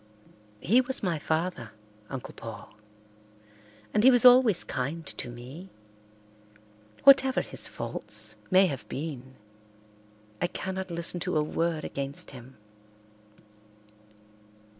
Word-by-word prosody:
"He 230 - +4
was 260 -2 0
my 170 -5 0
father, 160 -6 -2 0.4
Uncle 130 -2 -7
Paul, 115 -2 -10 1.2
and 210 - +2
he 260 - +9
was 245 -1 +5
always 245 -6 +7
kind 150 +6 -4
to 120 - -4
me; 130 +10 -10 1.3
whatever 270 -1 +6
his - - -5
faults - - -7
may 190 +1 +6
have 140 -8 -4
been 135 -3 -6 1.1
I - - +2
cannot 190 +1 -5
listen 170 +1 -1
to 180 -1 -1
a 150 - +2
word 165 0 -1
against 140 0 -3
him." 130 0 -13
165 Hz, 110 wpm, -28 LUFS, 135-190 Hz, 1.3 s, he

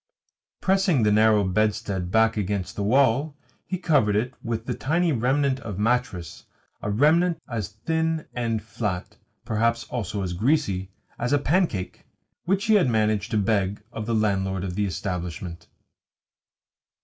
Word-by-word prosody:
Pressing 190 - +3
the 105 - +4
narrow 105 0 +4
bedstead 100 -1 0
back 110 +2 +3
against 100 -2 -2
the - - -3
wall, 135 +6 +2 0.3
he 185 - -2
covered 145 - +2
it 120 +5 0
with 115 -1 -3
the - - -2
tiny 165 +4 +1
remnant 135 +2 +1
of 110 -5 -6
mattress 105 -7 -1 0.4
a 105 - -3
remnant 160 - +3
as 105 -4 -4
thin 160 -1 0
and 115 -3 -1
flat 105 -4 -4 0.3
(perhaps 115 +1 +1
also 105 -4 -3
as 90 -1 -3
greasy) 100 - 0 0.3
as 125 +3 0
a - - +5
pancake 145 - -1 0.4
which 195 +2 +1
he 220 - +4
had 195 -11 +4
managed 110 -2 +1
to 110 - 0
beg 105 -1 0
of 115 -2 -5
the 115 - +1
landlord 95 -3 0
of 95 -2 -3
the 105 +2 0
establishment. 90 -2 -5
110 Hz, 150 wpm, -25 LUFS, 100-140 Hz, 0.4 s, a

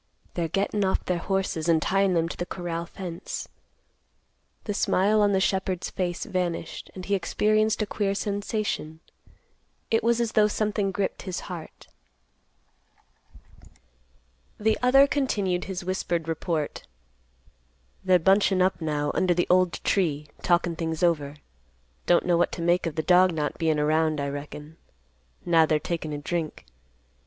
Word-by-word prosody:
"They're 170 -2 -1
gettin' 200 +4 0
off 190 - 0
their 180 -1 0
horses, 190 -3 -1
and 165 -1 +5
tyin' 195 +2 +2
them 165 0 +2
to - - -6
the 175 - -4
corral 170 -2 -4
fence." 175 0 -6 1.2
The 205 - -3
smile 205 +2 +2
on 205 -1 +4
the 190 - +2
shepherd's 190 -2 -1
face 175 -2 -2
vanished, 180 -6 -3
and 185 -1 -7
he 200 - -1
experienced 215 +3 +1
a - - -2
queer 200 -1 -1
sensation; 200 -6 -3 0.9
it 225 - +2
was 235 0 +2
as 235 -2 0
though 215 -2 +4
something 210 -2 -1
gripped 195 0 -2
his 185 -2 -4
heart. 175 -4 -9 2.7
The 215 +1 +2
other 265 +3 +6
continued 205 -11 0
his 185 -2 -5
whispered 175 -3 -2
report; 160 - -3 1.2
"They're 185 -1 +5
bunchin' 190 +2 +3
up 185 -1 +2
now 150 -2 -1
under 180 -2 +2
the 175 - +2
old 180 -1 +4
tree, 150 -6 0
talkin' 175 -1 +2
things 160 0 -3
over. 150 -4 +1 0.7
Don't 175 - +4
know 175 -1 +3
what 175 - +2
to 170 - -4
make 175 +1 +2
of 165 - -4
the 155 - -1
dog 180 0 +5
not 150 -2 -2
bein' 160 -2 +1
around, 155 0 +2
I 140 0 -1
reckon. 150 +2 -8 0.7
Now 165 -2 +4
they're 155 - +3
takin' 155 0 -4
a 145 - -3
drink. 160 +1 -4
180 Hz, 150 wpm, -26 LUFS, 165-195 Hz, 2.7 s, other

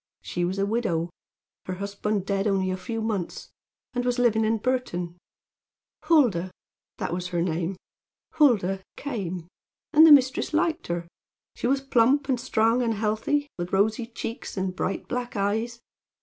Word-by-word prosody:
She 175 - -2
was 185 +2 -2
a 195 - +1
widow; 180 -7 -1 0.6
her 185 - -2
husband 200 +1 -2
dead 195 +1 0
only 190 -2 +1
a - - -1
few 225 +4 -4
months; 210 -6 -3 0.4
and 245 -1 -1
was 245 0 0
living 230 -3 +3
in 220 +1 +2
Burton. 210 -8 -2 0.9
Huldah 240 - +3 0.5
that - - -3
was 180 0 -2
her 175 -1 -2
name 175 +2 -1 0.6
Huldah 205 - +3 0.2
came; 185 - -4 0.5
and 315 +1 +9
the - - +8
mistress 265 +2 +5
liked 330 0 +1
her. 170 0 -3 0.5
She - - -2
was 270 +1 +2
plump, 270 +1 +3
and 255 -2 +2
strong, 230 +1 +2
and 230 -2 +1
healthy, 220 +7 0
with 175 +1 -4
rosy 215 +4 +2
cheeks 230 -2 -6
and 185 -1 -2
bright 190 - -2
black 245 -1 -3
eyes. 220 +4 -1
220 Hz, 155 wpm, -26 LUFS, 185-245 Hz, 0.9 s, and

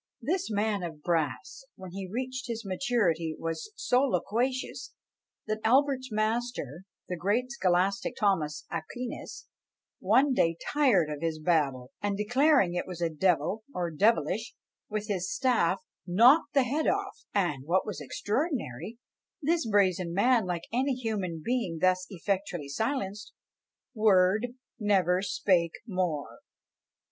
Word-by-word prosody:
This 360 +8 -1
man 210 -1 0
of 160 -4 -7
brass, 160 - -1
when 185 -2 -10
he 190 0 -6
reached 255 +4 -4
his 230 -2 -4
maturity, 185 - 0
was 165 - -4
so 250 -9 +2
loquacious, 250 +2 -1 0.5
that 215 0 -2
Albert's 260 +1 +2
master, 215 - -2 0.2
the 180 - -3
great 210 +9 0
scholastic 195 0 +1
Thomas 160 -8 +1
Aquinas, 230 +10 -6 0.5
one 255 +8 +4
day, 165 -8 +2 0.2
tired 250 - +4
of 150 0 -5
his 165 -1 -1
babble, 145 -6 0
and 205 -1 -1
declaring 245 - +3
it 175 - -2
was 180 -2 -7
a 170 -1 0
devil, 180 +5 +1
or 175 -2 -1
devilish, 220 +4 +1 0.3
with 210 -1 -3
his 205 - -2
staff 260 - +2 0.3
knocked 250 - +5
the 275 - +5
head 290 +6 -1
off; 400 0 -1
and, 170 -10 0
what 185 +3 +2
was 210 - -5
extraordinary, 220 - -3 0.4
this 320 -3 0
brazen 185 -4 +2
man, 230 0 +3
like 175 -2 -2
any 260 +2 +1
human 200 -10 -3
being 235 -9 -1
thus 185 +1 +2
effectually 185 -4 -3
silenced, 210 - -3 0.6
"word 215 +2 +3 0.2
never 190 -4 +2
spake 180 -4 +1
more." 180 -7 -2
200 Hz, 130 wpm, -29 LUFS, 175-245 Hz, 0.6 s, knocked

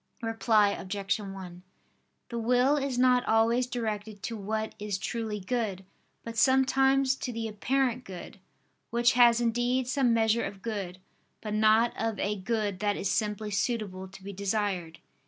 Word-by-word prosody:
Reply 225 -2 +3
Obj. 200 0 -2
1: 190 -3 -8 0.7
The 235 - -3
will 250 +4 +3
is 275 -3 -2
not 250 0 +4
always 230 +3 +3
directed 215 -4 -4
to 230 - -3
what 220 +1 -3
is 205 -2 -2
truly 220 0 -3
good, 200 -2 -2 0.4
but 230 0 -7
sometimes 265 +2 +3
to 250 - -4
the 225 -1 -3
apparent 250 +3 0
good; 190 -3 -10 0.5
which 240 +1 +3
has 240 -1 +5
indeed 240 +2 +1
some 260 -2 +2
measure 225 0 +2
of 195 -1 -6
good, 200 -5 -4 0.4
but 210 -1 -5
not 220 +2 +4
of 225 -2 -2
a 205 +2 -1
good 205 -1 -2
that 205 0 0
is 195 - -1
simply 210 -1 -1
suitable 200 -3 -2
to 195 0 -14
be 200 +1 -7
desired. 195 -4 -2
220 Hz, 155 wpm, -28 LUFS, 200-240 Hz, 0.7 s, has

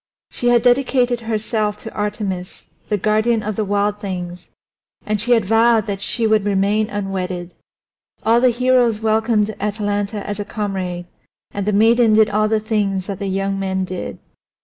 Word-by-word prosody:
She 245 - -2
had 240 -1 +4
dedicated 245 -1 +2
herself 215 -1 -1
to 225 - -8
Artemis, 200 -3 -4 0.2
the 210 - +1
guardian 215 +2 +1
of 215 0 -3
the 215 - 0
wild 205 +1 0
things, 180 -2 -6 0.6
and 210 -1 -1
she 245 +2 +3
had 225 -4 +2
vowed 225 +1 +3
that 195 -2 -4
she 230 +3 -1
would 215 -1 +3
remain 205 +2 +1
unwedded. 185 -4 -4 0.7
All 230 +2 +4
the 255 - +5
heroes 245 -2 +2
welcomed 220 -1 +1
Atalanta 205 0 -2
as 205 0 -4
a - - -1
comrade, 190 -4 -4 0.5
and 200 0 -4
the - - +3
maiden 225 +2 +4
did 215 0 +4
all 215 +1 +2
the 220 0 +1
things 205 -3 -1
that 200 -1 -5
the 200 - -3
young 195 +1 -1
men 190 -1 -1
did. 180 - -6
210 Hz, 170 wpm, -19 LUFS, 195-225 Hz, 0.7 s, the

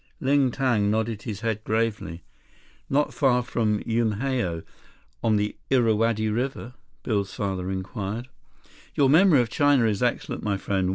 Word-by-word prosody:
Ling 140 0 +3
Tang 120 -5 +1
nodded 110 0 -1
his 105 -3 -6
head 110 -2 -2
gravely. 110 -7 -2 0.7
"Not 145 +2 +1
far 125 -3 +2
from 110 -3 -1
Unhao, 115 -5 -1 0.6
on 110 -2 +3
the 105 0 -1
Irrawaddy 115 -3 +2
River?" 120 +2 -3 0.3
Biff's 100 -5 -1
father 95 -2 -3
inquired. 95 +4 -4 0.7
"Your 135 -2 +4
memory 160 -3 +6
of 120 - -2
China 145 -5 +3
is 105 -3 0
excellent, 125 -1 -1
my 100 -2 -1
friend. 95 -1 -1
115 Hz, 135 wpm, -25 LUFS, 105-125 Hz, 0.7 s, memory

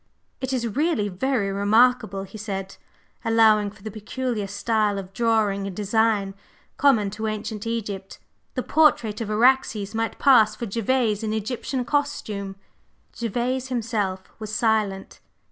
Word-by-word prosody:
"It 260 0 -3
is 250 -3 -1
really 245 -3 0
very 200 +1 -1
remarkable!" 205 0 +3
he 195 - -12
said. 195 -2 -5 0.5
"Allowing 220 -2 +4
for 195 -1 -17
the 215 - -5
peculiar 220 0 -3
style 205 +1 0
of 195 -1 -7
drawing 210 -3 +1
and 190 - -6
design 210 -1 +1 0.4
common 230 -9 +3
to 220 +2 -4
ancient 215 0 -4
Egypt, 205 -4 -4 0.4
the 255 - -1
portrait 240 -9 +3
of 220 - -3
Araxes 220 -2 +2
might 225 0 -2
pass 230 -6 +5
for 235 - -4
Gervase 230 0 0
in 215 -1 -2
Egyptian 245 +4 -3
costume." 215 -9 -2 0.6
Gervase 245 +3 -2
himself 215 -6 -2 0.2
was 215 -1 -6
silent. 215 -4 0
220 Hz, 135 wpm, -24 LUFS, 200-240 Hz, 0.6 s, pass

